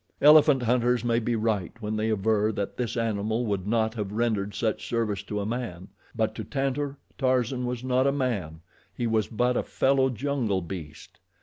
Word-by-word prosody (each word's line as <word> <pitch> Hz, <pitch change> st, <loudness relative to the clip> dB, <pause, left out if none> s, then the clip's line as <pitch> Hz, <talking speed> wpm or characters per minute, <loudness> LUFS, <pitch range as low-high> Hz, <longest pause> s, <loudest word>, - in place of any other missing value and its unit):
Elephant 150 Hz, -3 st, +7 dB
hunters 125 Hz, 0 st, +2 dB
may 115 Hz, -1 st, +2 dB
be 120 Hz, 0 st, -1 dB
right 110 Hz, -5 st, -1 dB
when 105 Hz, -1 st, -3 dB
they 110 Hz, +1 st, 0 dB
aver 110 Hz, 0 st, +2 dB
that 100 Hz, -2 st, -4 dB
this 120 Hz, -1 st, -3 dB
animal 110 Hz, +1 st, 0 dB
would 100 Hz, -3 st, -2 dB
not 110 Hz, 0 st, +1 dB
have 105 Hz, -4 st, -4 dB
rendered 105 Hz, -3 st, -1 dB
such 110 Hz, +1 st, -1 dB
service 110 Hz, -4 st, -1 dB
to 105 Hz, +1 st, -4 dB
a 100 Hz, -, -2 dB
man, 105 Hz, -6 st, -4 dB, 0.3 s
but 110 Hz, -1 st, 0 dB
to -, -, -5 dB
Tantor, 140 Hz, 0 st, -2 dB, 0.2 s
Tarzan 130 Hz, -1 st, +1 dB
was 125 Hz, 0 st, -4 dB
not 130 Hz, +1 st, +2 dB
a -, -, +4 dB
man 105 Hz, -, -2 dB, 0.3 s
he 120 Hz, -, -2 dB
was 110 Hz, -2 st, +1 dB
but 125 Hz, +3 st, +1 dB
a -, -, +2 dB
fellow 135 Hz, 0 st, +2 dB
jungle 120 Hz, -6 st, -1 dB
beast. 80 Hz, -4 st, -9 dB
115 Hz, 185 wpm, -27 LUFS, 105-125 Hz, 0.3 s, Elephant